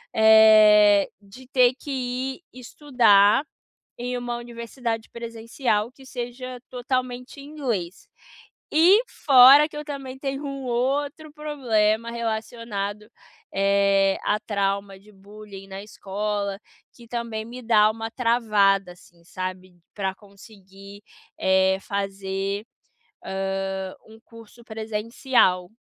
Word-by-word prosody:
eh, 215 -2 +6
de 205 +6 -15
ter 255 -1 +4
que 285 - -8
ir 260 +3 -3 0.2
estudar 235 -4 +3 0.5
em 245 +1 -4
uma 240 -1 -4
universidade 235 -1 -5
presencial 230 -1 -3
que 265 +1 -18
seja 250 0 -7
totalmente 250 +1 -4
em - - -11
inglês. 230 - -4 0.7
E 355 +8 +6
fora 275 +2 +7
que 295 - -10
eu 300 - -6
também 270 -3 -7
tenho 275 +1 -4
um 275 -1 -6
outro 280 +5 -2
problema 235 -7 0
relacionado, 220 -2 -4 0.5
eh, 195 0 +2
à 210 - +1
trauma 200 -2 -2
de 210 +2 -20
bullying 200 0 -13
na 195 0 -8
escola, 205 -1 -4 0.3
que 235 -1 -16
também 230 -2 -4
me 245 +2 -9
dá 215 -2 +4
uma 225 0 -6
travada, 210 -6 +2
assim, 175 -1 -22
sabe, 185 0 -7 0.2
pra 195 -2 -3
conseguir, 200 -1 -15 0.4
eh, 190 0 +3
fazer, 195 0 -4 0.6
hã, 195 0 -3
um 220 0 -16
curso 230 +1 -16
presencial. 220 -3 0
220 Hz, 110 wpm, -24 LUFS, 200-250 Hz, 0.7 s, fora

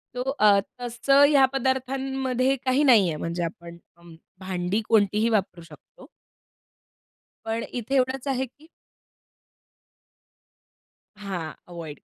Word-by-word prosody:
तो 250 - -2 0.2
अ, 205 -2 +6 0.2
तसं 245 +4 +3
ह्या 280 -3 +5
पदार्थांमध्ये 265 0 -1
काही 260 +3 +2
नाही 230 -9 +5
आहे, 160 - -3
म्हणजे 170 +2 -3
आपण 170 0 -7 0.6
भांडी 185 +2 -2
कोणतीही 215 0 +2
वापरू 190 -5 -1
शकतो. 330 - -17 1.4
पण 225 +1 -2
इथे 245 +3 -3
एवढंच 260 +1 0
आहे, 265 -1 0
की 290 +5 -21 2.5
हां. 185 -6 -6
अव्हॉइड. 165 -5 -9
230 Hz, 105 wpm, -25 LUFS, 185-265 Hz, 2.5 s, अ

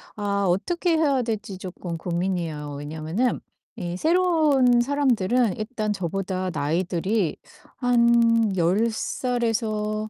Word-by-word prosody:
아 200 -1 -1
어떻게 330 - +1
해야 280 -5 +2
될지 215 -4 -4
쪼끔 180 -2 -6
고민이에요. 170 -4 -3
왜냐하면은 160 - -2 0.4
이 175 -4 -4
새로운 310 - +3
사람들은 245 -5 +1
일단 215 -1 -3
저보다 185 0 -3
나이들이 175 +5 -1 0.4
한 235 -3 +3
10 185 +7 +2
살에서 220 -3 -2
215 Hz, 245 characters per minute, -24 LUFS, 180-245 Hz, 0.4 s, 새로운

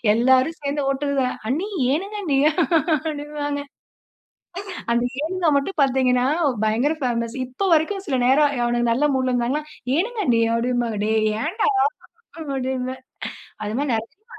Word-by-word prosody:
எல்லாரும் 260 +7 +3
சேர்ந்து 285 0 -1
ஓட்டுதுக, 275 0 0 0.3
அண்ணி, 310 - 0 0.3
ஏனுங்க 390 +8 -2
அண்ணி 295 -7 0 0.5
அப்பிடிம்பாங்க. 295 -2 -2 1.3
அந்த 235 0 +2 0.2
ஏனுங்க 355 +2 -1
மட்டும் 280 +6 -2
பார்த்தீங்கனா 255 -2 +2 0.4
பயங்கர 235 +8 +2
பேமஸ் 235 -1 -1
இப்ப 260 +11 -2
வரைக்கும் 380 +5 0
சில 270 -6 0
நேரம் 285 +3 +4
அவனுங்க 240 0 +1
நல்ல 285 +6 +2
மூட்ல 260 -1 0
இருந்தாங்கனா 245 +5 0 0.3
ஏனுங்க 440 +7 -1
அண்ணி 235 -3 +3
அப்பிடிம்பாங்க, 235 -2 0
டேய் 220 0 +2 0.2
ஏன்டா? 385 +10 0 0.7
அப்பிடின்னு 260 -3 -3 0.7
அது 210 +1 -3
மாதிரி 285 -3 0
நிறைய 230 - -4
270 Hz, 125 wpm, -22 LUFS, 245-305 Hz, 1.3 s, நேரம்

